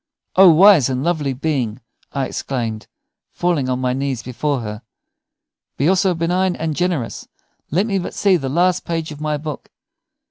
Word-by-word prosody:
"O 190 0 +8
wise 170 - +6
and 130 0 -2
lovely 155 -5 0
being!" 130 -5 -2 0.3
I 140 -1 -1
exclaimed, 115 -5 -4 0.4
falling 170 -7 -1
on 125 - 0
my 125 -1 0
knees 135 -2 -2
before 130 +2 -2
her, 105 -1 -6 1.0
"be 140 - +1
also 185 0 +3
benign 180 +3 0
and 160 -1 -3
generous. 175 -9 -2 0.4
Let 185 +7 +1
me 200 -4 0
but 180 - -6
see 200 -2 +3
the 135 -6 -2
last 180 +5 +2
page 165 -2 -3
of 150 0 -9
my 150 -1 -1
book. 150 -1 -7
150 Hz, 165 wpm, -19 LUFS, 130-175 Hz, 1.0 s, O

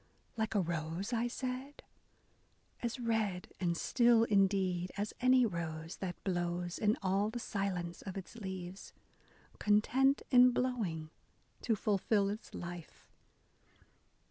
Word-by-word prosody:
Like 220 -1 -1
a - - +4
rose, 170 +4 -2
I 235 +1 +1
said? 255 +3 -5 1.0
As 240 +2 -2
red 220 -6 -1
and 170 -2 0
still 235 +1 +4
indeed 195 -4 +2
as 205 +1 -2
any 255 0 +5
rose, 165 -4 -4
That 180 -2 -5
blows 175 -1 -2
in 210 0 +2
all 195 +2 +2
the 230 - -5
silence 190 -6 -3
of 190 -1 -6
its 190 - -7
leaves, 190 -3 -7 0.7
Content, 255 +7 +3
in 250 -1 +7
blowing, 200 -12 -1 0.5
to 225 - +1
fulfil 200 0 +1
its 210 +3 -6
life. 175 -2 -8
200 Hz, 120 wpm, -34 LUFS, 175-235 Hz, 1.0 s, in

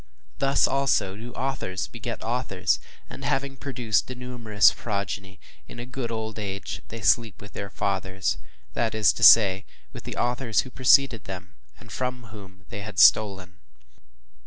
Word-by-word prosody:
Thus, 135 0 +3
also, 125 -8 +1
do 115 +3 -9
authors 120 -10 -3
beget 115 0 -6
authors, 115 -5 0 0.3
and - - -10
having 135 0 -1
produced 125 -6 -1
a 125 - -5
numerous 120 -4 +2
progeny, 100 -2 -5 0.3
in - - -11
a 120 - -6
good 125 -1 -5
old 110 -1 -4
age 100 -2 -5
they 115 0 -8
sleep 110 -1 +2
with 100 - -12
their 100 - -6
fathers, 95 -1 -2 0.3
that 115 -2 -1
is 110 -2 +4
to - - -8
say, 100 -4 +7 0.3
with - - -9
the - - -6
authors 120 -2 +1
who 130 - -11
preceded 130 -3 +4
them 95 -1 -8 0.3
and 115 0 -15
from 125 0 -3
whom 95 -2 -13
they 100 - -6
had 100 -1 -8
stolen. 95 -3 +4
110 Hz, 160 wpm, -25 LUFS, 100-125 Hz, 0.3 s, say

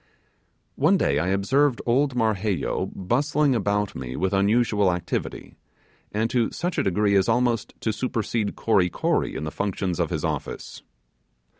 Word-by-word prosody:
One - - +4
day 70 - +1
I 85 - -1
observed 120 +8 +2
old 130 +2 +2
Marheyo 105 - 0
bustling 140 +8 +1
about 105 -2 0
me 65 -1 -6
with 95 +2 -1
unusual 105 0 +3
activity, 90 -1 -4 0.5
and 110 +2 0
to 120 -3 +2
such 175 +1 -3
a - - +2
degree 100 +2 +2
as 95 +1 +3
almost 120 -1 +1
to 110 - 0
supersede 115 -2 -2
Kory 100 -5 +2
Kory - - -1
in - - -4
the 75 - -4
functions 95 -3 -2
of - - +1
his - - -2
office. - - -5
105 Hz, 150 wpm, -24 LUFS, 95-120 Hz, 0.5 s, One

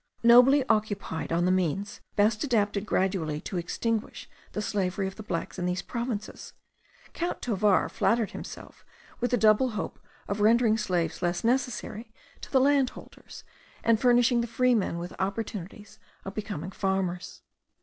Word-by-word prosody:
Nobly 250 +4 +7
occupied 210 -8 -1
on 170 +1 +2
the 180 - +3
means 185 +2 -1
best 210 +3 +2
adapted 210 -6 0
gradually 180 -7 0
to 190 - -5
extinguish 225 +5 -3 0.3
the - - -3
slavery 195 -1 -1
of 190 - -5
the - - -8
blacks 185 -2 -4
in 180 - -1
these 180 +1 -2
provinces, 235 -3 -5 0.6
Count 345 +1 -3
Tovar 210 -4 +2
flattered 230 -2 +1
himself - - -9 0.4
with 245 - 0
the 245 - +2
double 215 +4 +4
hope - - -4 0.3
of 200 +1 -2
rendering 225 +1 +4
slaves 180 -6 -1
less 175 0 -1
necessary 235 -2 -1 0.3
to - - -10
the 265 - +5
landholders, 275 -1 -1 0.4
and 230 -1 +3
furnishing 245 -1 +4
the 235 - -3
freedmen 235 -6 +1
with 175 +1 -6
opportunities 200 0 -5 0.3
of 195 - -6
becoming 205 -5 -5
farmers. 190 -2 -2
210 Hz, 145 wpm, -27 LUFS, 190-235 Hz, 0.6 s, Nobly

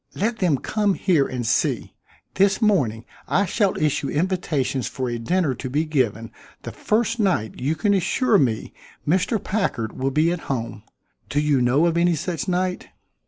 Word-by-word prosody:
Let 225 +2 -1
them 175 -7 +2
come 205 - 0
here 160 -7 +2
and 125 -2 -4
see. 115 - 0 0.4
This 195 +1 +3
morning 135 - +1 0.2
I 200 - +2
shall 200 +1 0
issue 150 -2 0
invitations 150 -6 -1
for 130 -1 -4
a 120 - -3
dinner 165 +4 0
to 130 +1 -6
be 150 +5 0
given 115 -7 -1 0.3
the - - -6
first 230 +2 0
night 180 - 0
you 145 +5 0
can 205 +6 +1
assure 200 +4 +2
me 120 -6 -1 0.3
Mr. 185 +8 +2
Packard 190 - -2
will 135 +1 -1
be 155 +5 +2
at 175 - -2
home. 115 -5 -3 0.5
Do 145 - 0
you 145 -3 +2
know 130 +7 +3
of 170 -1 +1
any 170 0 +3
such 170 +4 -3
night?" 180 0 -1
160 Hz, 170 wpm, -23 LUFS, 130-190 Hz, 0.5 s, This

